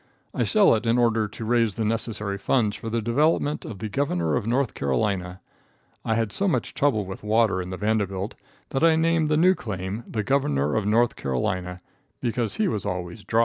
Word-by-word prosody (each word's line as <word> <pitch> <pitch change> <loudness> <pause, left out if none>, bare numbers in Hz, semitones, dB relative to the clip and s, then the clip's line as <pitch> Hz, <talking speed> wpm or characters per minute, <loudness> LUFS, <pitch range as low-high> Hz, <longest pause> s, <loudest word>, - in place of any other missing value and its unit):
I - - 0
sell 210 -2 +5
it 115 +1 -1
in 115 +1 +3
order 115 -3 +2
to 110 +2 -8
raise 115 -2 +2
the 115 - -1
necessary 105 -2 -2
funds 105 -1 +1
for 115 - -6
the 115 0 -1
development 145 +5 +1
of 110 - -7
the 110 - -4
Governor 90 - 0
of 105 - -2
North 125 +1 +1
Carolina. 90 +7 -1 0.6
I 115 - 0
had 115 -2 0
so 200 - 0
much 180 - 0
trouble 125 -8 +1
with 95 0 -8
water 105 -3 +2
in 90 - -6
the 95 - -5
Vanderbilt, 105 -1 -1 0.4
that 135 - -1
I 165 -1 +6
named 160 -1 +2
the 150 - +2
new 180 +4 +5
claim 100 - -5
the 110 -2 -2
Governor 75 - +1
of 105 -2 0
North 115 +3 +3
Carolina, 90 +7 -2 0.4
because 120 -2 -1
he 215 - +1
was 110 - -2
always 90 +1 -4
dry. 115 - +1
110 Hz, 200 wpm, -25 LUFS, 95-120 Hz, 0.6 s, I